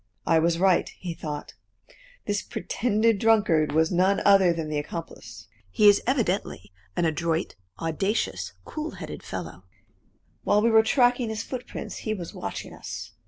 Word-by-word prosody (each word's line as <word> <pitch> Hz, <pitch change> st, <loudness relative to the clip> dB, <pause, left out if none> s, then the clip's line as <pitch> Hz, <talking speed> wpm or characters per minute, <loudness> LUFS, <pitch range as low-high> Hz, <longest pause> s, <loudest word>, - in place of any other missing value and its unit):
"I 165 Hz, -, +4 dB
was 165 Hz, +1 st, +2 dB
right," 185 Hz, -1 st, +3 dB
he 175 Hz, -2 st, -5 dB
thought; 150 Hz, -3 st, -6 dB, 0.7 s
"this 205 Hz, -1 st, -1 dB
pretended 220 Hz, -1 st, 0 dB
drunkard 205 Hz, -9 st, +3 dB
was 160 Hz, +3 st, +2 dB
none 185 Hz, +2 st, +3 dB
other 195 Hz, -3 st, +6 dB
than 165 Hz, -2 st, -3 dB
the 150 Hz, -1 st, -1 dB
accomplice. 155 Hz, -4 st, -8 dB, 0.2 s
He 210 Hz, -, +4 dB
is 205 Hz, 0 st, +6 dB
evidently 200 Hz, -, -1 dB, 0.2 s
an 175 Hz, -, +1 dB
adroit, 165 Hz, +1 st, -1 dB, 0.3 s
audacious, 160 Hz, -, -1 dB
cool 310 Hz, +1 st, -5 dB
headed -, -, -7 dB
fellow. -, -, -7 dB, 0.8 s
While 210 Hz, +1 st, +3 dB
we 230 Hz, -, +4 dB
were 220 Hz, 0 st, +7 dB
tracking 245 Hz, +1 st, +2 dB
his 220 Hz, 0 st, -3 dB
footprints 250 Hz, -2 st, -6 dB
he 215 Hz, -1 st, -3 dB
was 175 Hz, -4 st, -7 dB
watching -, -, -6 dB
us. -, -, -7 dB
190 Hz, 150 wpm, -26 LUFS, 165-220 Hz, 0.8 s, were